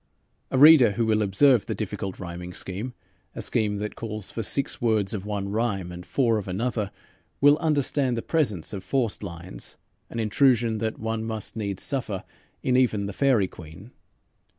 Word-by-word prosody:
A -, -, 0 dB
reader 145 Hz, -6 st, +8 dB
who 115 Hz, +3 st, 0 dB
will 110 Hz, -1 st, +2 dB
observe 105 Hz, +4 st, +4 dB
the -, -, -2 dB
difficult 95 Hz, -1 st, -4 dB
rhyming 90 Hz, 0 st, -7 dB
scheme, 105 Hz, +9 st, -4 dB, 0.4 s
a -, -, -4 dB
scheme 105 Hz, -3 st, 0 dB
that 105 Hz, +1 st, -4 dB
calls 110 Hz, -3 st, -5 dB
for 115 Hz, -, -3 dB
six 135 Hz, +5 st, 0 dB
words 110 Hz, -4 st, +1 dB
of 100 Hz, -1 st, -4 dB
one 100 Hz, -2 st, -3 dB
rhyme 105 Hz, -5 st, -1 dB
and 90 Hz, 0 st, -8 dB
four 115 Hz, +3 st, +1 dB
of 100 Hz, -, -7 dB
another, 105 Hz, +2 st, -2 dB, 0.5 s
will 145 Hz, +1 st, +6 dB
understand 145 Hz, -5 st, +1 dB
the 115 Hz, -, -3 dB
presence 110 Hz, -, 0 dB
of 95 Hz, -, -5 dB
forced 125 Hz, -6 st, 0 dB
lines, 85 Hz, -9 st, -7 dB, 0.3 s
an 115 Hz, -, -5 dB
intrusion 115 Hz, 0 st, +3 dB
that 110 Hz, 0 st, -2 dB
one 110 Hz, 0 st, -3 dB
must 110 Hz, -2 st, -4 dB
needs 100 Hz, -4 st, -3 dB
suffer 115 Hz, -9 st, -2 dB, 0.4 s
in 125 Hz, -, +2 dB
even 110 Hz, -6 st, +2 dB
"The 100 Hz, -, -5 dB
Faerie 125 Hz, -6 st, +3 dB
Queene." 90 Hz, +7 st, -12 dB
110 Hz, 175 wpm, -25 LUFS, 100-125 Hz, 0.5 s, reader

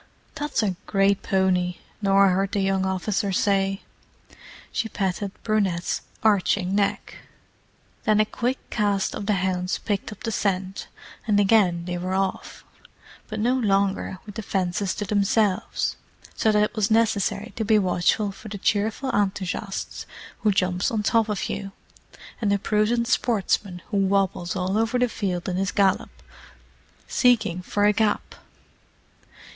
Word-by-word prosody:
"That's 295 Hz, -6 st, -1 dB
a 195 Hz, -3 st, 0 dB
great 195 Hz, 0 st, +2 dB
pony!" 180 Hz, -2 st, +1 dB, 0.2 s
Norah 195 Hz, -1 st, +5 dB
heard 195 Hz, +2 st, 0 dB
the 205 Hz, -, +1 dB
young 195 Hz, -1 st, +1 dB
officer 195 Hz, +1 st, -1 dB
say. 195 Hz, 0 st, +1 dB, 0.9 s
She 225 Hz, -, -2 dB
patted 195 Hz, 0 st, -2 dB
Brunette's 195 Hz, -6 st, 0 dB, 0.2 s
arching 200 Hz, -3 st, +2 dB
neck. 200 Hz, 0 st, -1 dB, 0.9 s
Then 215 Hz, -2 st, +4 dB
a 215 Hz, -, +5 dB
quick 245 Hz, +4 st, -2 dB
cast 205 Hz, -3 st, 0 dB
of 200 Hz, -, -5 dB
the 210 Hz, -, +3 dB
hounds 180 Hz, 0 st, -1 dB
picked 205 Hz, -1 st, -3 dB
up 210 Hz, -, -11 dB
the 225 Hz, -, -2 dB
scent, 190 Hz, -2 st, -2 dB, 0.4 s
and 205 Hz, -2 st, +3 dB
again 195 Hz, -5 st, +3 dB
they 175 Hz, 0 st, -3 dB
were 185 Hz, +1 st, -2 dB
off, 190 Hz, 0 st, -3 dB, 0.6 s
but 215 Hz, -, -5 dB
no 240 Hz, +4 st, +2 dB
longer 200 Hz, -5 st, +1 dB
with 205 Hz, -, -9 dB
the 220 Hz, -, -5 dB
fences 190 Hz, -1 st, -1 dB
to 205 Hz, -, -3 dB
themselves; 205 Hz, -1 st, +1 dB, 0.4 s
so 220 Hz, -, +2 dB
that 210 Hz, 0 st, +3 dB
it 210 Hz, +2 st, -2 dB
was 215 Hz, -1 st, +1 dB
necessary 220 Hz, -1 st, +1 dB
to 225 Hz, -, -2 dB
be 220 Hz, 0 st, +4 dB
watchful 195 Hz, +2 st, +1 dB
for 215 Hz, -, -12 dB
the 200 Hz, -, -5 dB
cheerful 215 Hz, +6 st, 0 dB
enthusiast 195 Hz, -1 st, -2 dB, 0.3 s
who 215 Hz, -, +2 dB
jumps 185 Hz, -1 st, +1 dB
on 215 Hz, -2 st, -1 dB
top 225 Hz, +1 st, +2 dB
of 210 Hz, -, -2 dB
you, 195 Hz, -1 st, -5 dB, 0.7 s
and 210 Hz, -3 st, +1 dB
the 200 Hz, -, +3 dB
prudent 215 Hz, +3 st, +1 dB
sportsman 200 Hz, -7 st, 0 dB
who 205 Hz, -, 0 dB
wobbles 195 Hz, -2 st, +1 dB
all 190 Hz, +3 st, 0 dB
over 225 Hz, +2 st, +1 dB
the 250 Hz, 0 st, +3 dB
field 185 Hz, -6 st, -3 dB
in 180 Hz, -1 st, -1 dB
his 190 Hz, 0 st, 0 dB
gallop, 195 Hz, -2 st, +2 dB, 1.0 s
seeking 220 Hz, -8 st, +2 dB
for 205 Hz, +3 st, 0 dB
a 210 Hz, -, +5 dB
gap. 215 Hz, 0 st, 0 dB
200 Hz, 150 wpm, -24 LUFS, 190-215 Hz, 1.0 s, Norah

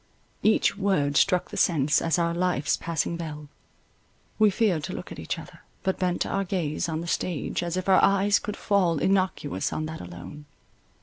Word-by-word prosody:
Each 215 Hz, -, +3 dB
word 150 Hz, -8 st, +1 dB
struck 180 Hz, +3 st, +2 dB
the -, -, -6 dB
sense, 145 Hz, -4 st, +3 dB
as 165 Hz, +1 st, +1 dB
our 170 Hz, -1 st, +1 dB
life's 175 Hz, -4 st, +1 dB
passing 170 Hz, 0 st, -2 dB
bell; 150 Hz, -3 st, -7 dB, 0.9 s
we 215 Hz, -1 st, +6 dB
feared 190 Hz, -6 st, +1 dB
to -, -, -5 dB
look -, -, -7 dB
at -, -, -8 dB
each -, -, -3 dB
other, -, -, -11 dB, 0.2 s
but 190 Hz, -, -1 dB
bent 180 Hz, -1 st, 0 dB
our 195 Hz, -, -1 dB
gaze 170 Hz, -4 st, -2 dB
on 160 Hz, 0 st, -2 dB
the 170 Hz, -, -6 dB
stage, 175 Hz, -2 st, -2 dB
as 175 Hz, 0 st, -2 dB
if 185 Hz, -, -3 dB
our 190 Hz, -, +6 dB
eyes 200 Hz, +1 st, +4 dB
could 210 Hz, -2 st, -5 dB
fall 185 Hz, -5 st, +2 dB
innocuous 185 Hz, -, 0 dB
on 155 Hz, -, -2 dB
that 160 Hz, +1 st, -6 dB
alone. 90 Hz, +12 st, -10 dB
170 Hz, 185 wpm, -26 LUFS, 155-190 Hz, 0.9 s, we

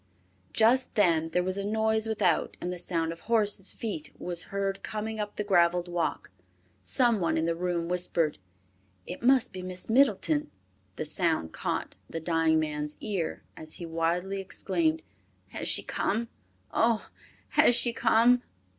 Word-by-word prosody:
Just 245 Hz, +4 st, +3 dB
then 165 Hz, -6 st, +3 dB
there 180 Hz, +2 st, +1 dB
was 185 Hz, +2 st, -1 dB
a -, -, -2 dB
noise 220 Hz, +1 st, +1 dB
without, 200 Hz, -6 st, +1 dB
and 180 Hz, +1 st, -3 dB
the 180 Hz, -, -6 dB
sound 165 Hz, -2 st, -1 dB
of 165 Hz, -, -8 dB
horses' 210 Hz, -3 st, +1 dB
feet 200 Hz, -10 st, -4 dB
was 175 Hz, -1 st, -2 dB
heard 195 Hz, 0 st, -2 dB
coming 220 Hz, +1 st, -4 dB
up 205 Hz, -1 st, -4 dB
the 210 Hz, -, -2 dB
graveled 175 Hz, -3 st, +3 dB
walk. 175 Hz, -2 st, -2 dB, 0.5 s
Some 240 Hz, -5 st, +2 dB
one 170 Hz, -, +1 dB
in 160 Hz, -, +1 dB
the 165 Hz, -, +1 dB
room 170 Hz, 0 st, -2 dB
whispered, 170 Hz, -, +1 dB, 0.7 s
"It 180 Hz, -, -7 dB
must 255 Hz, -2 st, +3 dB
be 185 Hz, -, -6 dB
Miss 185 Hz, +3 st, -5 dB
Middleton." 200 Hz, -, +3 dB, 0.5 s
The -, -, -4 dB
sound 160 Hz, -, 0 dB
caught -, -, -3 dB, 0.2 s
the 165 Hz, -, -4 dB
dying 165 Hz, -1 st, +2 dB
man's 150 Hz, -1 st, -3 dB
ear 195 Hz, -7 st, -3 dB
and 160 Hz, -, -9 dB
he 170 Hz, -, -6 dB
wildly 170 Hz, +4 st, -1 dB
exclaimed, 170 Hz, -4 st, -1 dB, 0.5 s
"Has -, -, -5 dB
she -, -, +1 dB
come? 230 Hz, +3 st, -1 dB, 0.4 s
Oh! 230 Hz, -1 st, +2 dB, 0.4 s
Has 240 Hz, -, +5 dB
she 240 Hz, -1 st, +2 dB
come?" 235 Hz, +2 st, +4 dB
180 Hz, 155 wpm, -28 LUFS, 165-220 Hz, 0.7 s, Has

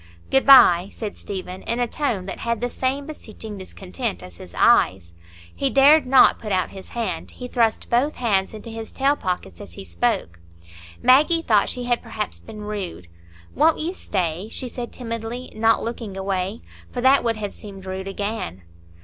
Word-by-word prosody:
"Good 270 Hz, 0 st, +3 dB
bye," 190 Hz, -9 st, +8 dB
said 215 Hz, -3 st, -6 dB
Stephen, 185 Hz, -1 st, -7 dB
in 235 Hz, -, -2 dB
a 245 Hz, -, +2 dB
tone 235 Hz, -7 st, -2 dB
that 190 Hz, -, -6 dB
had 235 Hz, -1 st, -1 dB
the 245 Hz, +1 st, -2 dB
same 270 Hz, +2 st, -1 dB
beseeching 220 Hz, -8 st, -9 dB
discontent 195 Hz, +4 st, -5 dB
as 90 Hz, -2 st, -11 dB
his 90 Hz, -1 st, -12 dB
eyes. 85 Hz, -1 st, +3 dB, 0.4 s
He 275 Hz, -, 0 dB
dared 275 Hz, +2 st, +6 dB
not 265 Hz, 0 st, +6 dB
put 210 Hz, -, -6 dB
out 185 Hz, -1 st, 0 dB
his 190 Hz, -1 st, -10 dB
hand; 235 Hz, -1 st, -3 dB
he 250 Hz, -, -8 dB
thrust 230 Hz, -3 st, +1 dB
both 260 Hz, +6 st, +1 dB
hands 205 Hz, -4 st, 0 dB
into 220 Hz, +2 st, -9 dB
his 225 Hz, 0 st, -7 dB
tail 275 Hz, +2 st, +2 dB
pockets 180 Hz, -, -4 dB
as 90 Hz, -, -11 dB
he 95 Hz, -, -9 dB
spoke. 85 Hz, 0 st, -1 dB, 0.6 s
Maggie 305 Hz, +6 st, +5 dB
thought 210 Hz, -7 st, +3 dB
she 250 Hz, -, -4 dB
had 245 Hz, -1 st, 0 dB
perhaps 220 Hz, -2 st, -4 dB
been 215 Hz, -1 st, -10 dB
rude. 200 Hz, -, -6 dB, 0.4 s
"Won't 315 Hz, +3 st, +4 dB
you 330 Hz, +4 st, -2 dB
stay?" 185 Hz, -, -3 dB
she 255 Hz, -, -4 dB
said 240 Hz, 0 st, -6 dB
timidly, 230 Hz, +1 st, -6 dB
not 225 Hz, +1 st, +2 dB
looking 225 Hz, -4 st, -5 dB
away, 190 Hz, +2 st, -2 dB, 0.3 s
for 245 Hz, -, -3 dB
that 265 Hz, +2 st, +5 dB
would 230 Hz, -2 st, 0 dB
have 205 Hz, -2 st, -4 dB
seemed 195 Hz, -2 st, -11 dB
rude 190 Hz, 0 st, -5 dB
again. 200 Hz, -, -4 dB
220 Hz, 180 wpm, -23 LUFS, 190-250 Hz, 0.6 s, bye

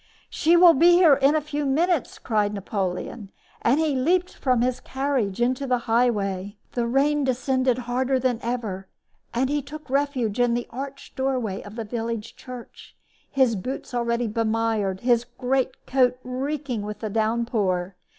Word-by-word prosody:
"She 335 Hz, +2 st, +3 dB
will 345 Hz, -1 st, +8 dB
be 340 Hz, +5 st, +6 dB
here 345 Hz, -4 st, +7 dB
in 275 Hz, +2 st, +4 dB
a 310 Hz, -, +2 dB
few 295 Hz, 0 st, -3 dB
moments!" 315 Hz, +3 st, +1 dB
cried 210 Hz, -2 st, 0 dB
Napoleon; 195 Hz, +1 st, -4 dB, 0.3 s
and 260 Hz, +6 st, +3 dB
he 315 Hz, -2 st, +1 dB
leaped 345 Hz, +8 st, +1 dB
from 255 Hz, -3 st, +1 dB
his 255 Hz, 0 st, 0 dB
carriage 265 Hz, -7 st, -2 dB
into 255 Hz, +3 st, 0 dB
the 250 Hz, -1 st, +2 dB
highway. 205 Hz, -4 st, 0 dB
The 240 Hz, -1 st, -1 dB
rain 285 Hz, +4 st, +2 dB
descended 260 Hz, -1 st, +1 dB
harder 255 Hz, +2 st, 0 dB
than 250 Hz, -2 st, 0 dB
ever, 220 Hz, -6 st, -3 dB, 0.4 s
and 255 Hz, +3 st, +1 dB
he 290 Hz, +1 st, 0 dB
took 305 Hz, +2 st, -10 dB
refuge 265 Hz, -6 st, 0 dB
in 240 Hz, -1 st, +3 dB
the 240 Hz, -, -2 dB
arched 275 Hz, +3 st, -7 dB
doorway 255 Hz, -7 st, -1 dB
of 205 Hz, +1 st, -11 dB
the 230 Hz, -1 st, -4 dB
village 230 Hz, 0 st, -4 dB
church, 250 Hz, -2 st, -11 dB, 0.3 s
his 260 Hz, -4 st, +2 dB
boots 255 Hz, +7 st, -5 dB
already 235 Hz, 0 st, 0 dB
bemired, 220 Hz, -3 st, 0 dB
his 240 Hz, -1 st, +3 dB
great 260 Hz, 0 st, -1 dB
coat 250 Hz, -1 st, +2 dB
reeking 260 Hz, -1 st, -3 dB
with 210 Hz, +1 st, -6 dB
the 215 Hz, -, -3 dB
downpour. 215 Hz, -5 st, 0 dB
250 Hz, 160 wpm, -24 LUFS, 225-275 Hz, 0.4 s, will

